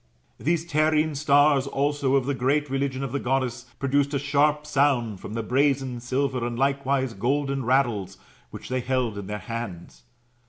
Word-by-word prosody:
These 165 +2 0
terrene 155 -1 +2
stars 145 -1 +4
also, 140 -1 0
of 135 -2 +2
the 140 - 0
great 140 +2 0
religion 135 -1 -1
of 135 - -4
the 140 - -1
Goddess, 130 -2 -1
produced 140 +1 +1
a - - +3
sharp 145 +2 +1
sound 135 -8 +1
from 105 - -7
the 115 - -2
brazen, 135 0 +1
silver, 130 +1 -1
and 120 0 -3
likewise 135 -1 0
golden 135 +5 -1
rattles, 115 -8 +1 0.3
which - - -9
they 130 0 -1
held 125 -3 -1
in 100 - -7
their 105 0 -3
hands. 100 - -7
135 Hz, 165 wpm, -25 LUFS, 120-140 Hz, 0.3 s, stars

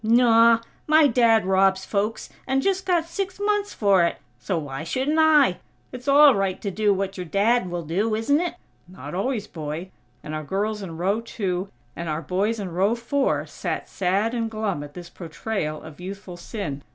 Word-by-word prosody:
"Naw! 230 0 +5 0.3
My 310 0 +6
Dad 230 -5 +4
robs 190 0 +3
folks, 210 +2 -2 0.2
and 270 0 +1
just 385 -1 0
got 345 -3 +2
six 375 +3 -4
months 410 0 0
for 195 -4 +3
it. 170 - 0 0.2
So 165 +9 -2
why 145 -2 -5
shouldn't 265 - 0
I? 300 - +5 0.3
It's 250 +2 -9
all 285 0 +7
right 195 -3 -1
to 200 - -3
do 210 +1 +2
what 195 0 -2
your 180 - -4
Dad 205 +3 +2
will 175 -1 -4
do, 200 +8 0
isn't 285 +8 +2
it?" 350 - -3 0.3
"Not 175 -5 -9
always, 210 +3 -1
boy," 160 +2 -6 0.3
and 150 - -6
our 155 0 -3
girls 210 +6 -2
in 170 -4 -7
row 195 +6 0
two 195 -5 -3 0.3
and 170 -1 -5
our 155 +2 -2
boys 200 +7 -1
in 190 -3 -5
row 195 +6 +2
four 265 +4 0
sat - - -4
sad 195 +5 0
and 230 -2 -1
glum 215 -7 -2
at 145 0 -11
this 175 -1 -9
portrayal 160 -1 -4
of 155 -1 -12
youthful 190 -1 -7
sin. 170 -6 -5
200 Hz, 190 wpm, -24 LUFS, 180-240 Hz, 0.3 s, all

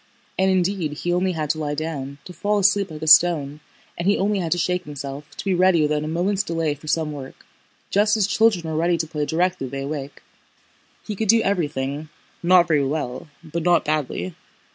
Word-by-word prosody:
And 190 0 +3
indeed 185 -4 0
he 175 +4 -2
only 185 +1 +1
had 155 -3 -1
to 155 - -4
lie 145 -1 -2
down, 140 -3 -4
to 180 - -9
fall 205 +5 0
asleep 200 -1 +3
like 155 -1 -8
a - - -3
stone, 155 -3 +5 0.4
and 170 - -3
he 200 - +4
only 205 +1 +1
had 170 -3 -3
to - - -3
shake 180 +1 0
himself, 140 0 -7
to - - -6
be 195 - +1
ready 180 -3 +4
without 150 0 0
a - - -4
moment's 185 +5 0
delay 165 -5 -1
for 145 +2 -14
some 155 0 0
work, 135 -3 -9 0.5
just 205 +2 +3
as 210 - +3
children 210 -4 +2
are 160 -1 -3
ready 170 +2 +2
to 165 - -1
play 150 -2 -3
directly 175 -4 0
they 135 +2 -5
awake. 145 -1 -6 0.8
He 210 - -4
could 220 +2 -2
do 225 +2 +5
everything, 150 -5 -2 0.3
not 175 0 +5
very 150 -3 +2
well 135 -1 -3 0.2
but 165 +1 -4
not 175 0 +3
badly. 135 - -2
165 Hz, 205 wpm, -22 LUFS, 150-185 Hz, 0.8 s, stone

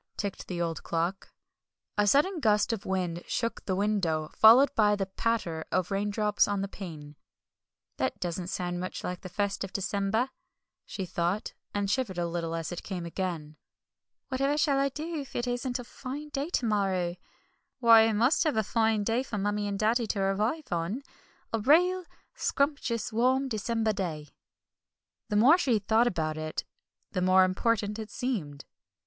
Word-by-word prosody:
ticked 200 -2 -4
the 175 -2 -4
old 165 -2 -2
clock. 170 +4 -2 0.6
A 210 0 +2
sudden 310 - +3
gust 215 -3 +3
of 210 -3 -5
wind 180 -3 -1
shook 230 -1 -2
the 190 - 0
window, 185 -6 0
followed 245 +6 +7
by 210 -3 +4
the 195 -1 -1
patter 190 -5 -2
of 185 0 0
raindrops 205 +1 +1
on 205 -1 -1
the 195 - -2
pane. 155 -7 -9 0.8
"That - - -1
doesn't 175 0 -3
sound 175 -1 -3
much 185 +1 -5
like 180 0 -4
the 185 - -8
first 200 +1 -1
of 195 - -6
December," 200 +6 0 0.6
she 190 - -4
thought, 175 +4 -2 0.2
and 205 -1 -1
shivered 210 -4 -1
a 175 - 0
little 165 -1 -3
as 165 0 -4
it 175 - -5
came 180 -4 -5
again. 165 -4 -4 0.7
"Whatever 275 +2 +1
shall 285 -3 +3
I 275 0 +2
do 315 +4 -5
if 275 -3 -9
it 240 - -1
isn't 245 0 -2
a 245 - -6
fine 275 +5 -7
day 290 +2 -3
to 260 - 0
morrow? 190 -5 0 0.6
Why, 230 -3 +7
I 225 - +1
must 240 +11 +3
have 300 -7 +1
a 220 - +3
fine 220 0 +1
day 225 +4 +1
for 235 -5 -5
Mummie 205 +1 -1
and 200 -1 -2
Daddy 225 +3 +1
to 205 - -2
arrive 210 +10 0
on 175 +10 -2 0.5
a 225 - +1
real 355 - +4 0.3
scrumptious, 280 -6 -1
warm, 260 +4 +2
December 220 0 0
day." 160 -7 -4 1.0
The 210 - -1
more 265 - +6
she 250 -9 +2
thought 220 +3 +3
about 155 -6 -1
it 155 0 -4 0.5
the 185 - -1
more 185 +1 +5
important 210 +3 0
it 220 -1 -6
seemed. 180 - -3
210 Hz, 170 wpm, -29 LUFS, 185-240 Hz, 1.0 s, followed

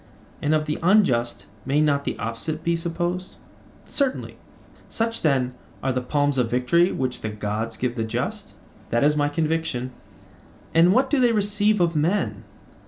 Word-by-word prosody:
And 150 +2 +2
of 155 0 0
the 150 0 -2
unjust 165 - +2 0.2
may 140 +5 +1
not 145 -2 +2
the - - -2
opposite 115 +9 -4
be 170 0 +1
supposed? 175 +2 -3 0.5
Certainly. 275 -2 -2 0.5
Such, 230 0 -2
then, 130 -5 +1 0.3
are 135 - +1
the 125 - -1
palms 145 +1 +1
of 120 -2 +1
victory 125 +9 +3
which 130 -1 -2
the 110 - -3
gods 105 +2 -3
give 125 -1 -1
the 115 - -1
just? 125 - -4 0.3
That 120 +2 +1
is 150 +1 +4
my 145 -1 +1
conviction. 155 -5 -1 0.8
And 170 +2 +6
what 260 +6 +2
do 290 - +3
they 245 -2 +4
receive 205 0 +2
of 170 -2 +2
men? 170 +7 0
150 Hz, 165 wpm, -24 LUFS, 125-180 Hz, 0.8 s, And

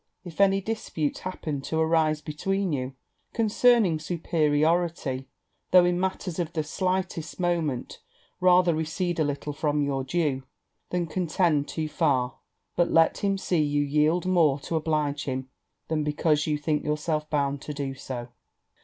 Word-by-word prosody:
If 175 0 -4
any 195 0 +4
dispute 190 -8 -3
happen 155 -6 -4
to 160 +3 -3
arise 160 -1 +2
between 185 +5 -1
you 130 -1 -3 0.4
concerning 225 -5 +3
superiority, 155 -3 0 0.4
though 180 -1 +7
in 175 0 +1
matters 185 -2 -2
of 170 -1 -2
the 155 - 0
slightest 180 -1 -2
moment, 165 -8 -1 0.4
rather 180 -1 +5
recede 165 +2 -2
a - - +4
little 145 0 -3
from 145 0 0
your 135 -1 -1
due 140 -2 0 0.5
than 180 -1 0
contend 165 -3 +1
too 155 -1 -3
far; 140 -6 0 0.4
but 175 - +2
let 165 0 +4
him 195 -1 +1
see 180 -4 0
you 145 -1 +1
yield 150 +5 +2
more 165 -6 +3
to 165 - -3
oblige 150 -2 0
him 130 -1 -3 0.4
than 155 -1 0
because 150 0 +1
you 150 -1 +1
think 150 0 -1
yourself 150 0 -1
bound 140 -2 0
to - - -6
do 140 -2 -3
so. 130 -2 -6
155 Hz, 150 wpm, -26 LUFS, 145-175 Hz, 0.5 s, though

